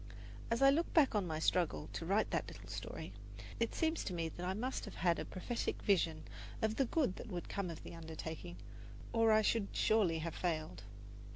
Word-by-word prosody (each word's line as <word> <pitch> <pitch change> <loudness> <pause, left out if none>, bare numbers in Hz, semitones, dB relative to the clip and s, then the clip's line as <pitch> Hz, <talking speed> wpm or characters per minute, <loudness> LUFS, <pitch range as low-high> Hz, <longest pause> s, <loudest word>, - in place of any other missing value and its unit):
As 230 +3 +2
I 275 - +9
look 325 +5 +1
back 300 -6 +6
on 205 -4 +1
my 160 -1 -2
struggle 160 -1 +1
to 165 - -4
write 205 +4 +2
that - - 0
little - - -10
story, - - -6 0.5
it - - 0
seems 320 0 +1
to 185 - -2
me 165 -1 -1
that 175 - -8
I 185 +1 -1
must 255 +5 -2
have - - -8
had 170 -2 +2
a - - -3
prophetic 230 +6 -3
vision 165 -6 +2 0.4
of 220 0 0
the 270 - +4
good 250 - +1
that - - -7
would 180 -5 -4
come 200 -3 -2
of 165 - -7
the - - -8
undertaking, 160 +1 -6 0.6
or 225 -1 +5
I 215 0 +5
should 215 -2 +2
surely 205 -7 +3
have 165 0 -3
failed. 155 - -2
185 Hz, 205 wpm, -36 LUFS, 165-225 Hz, 0.6 s, I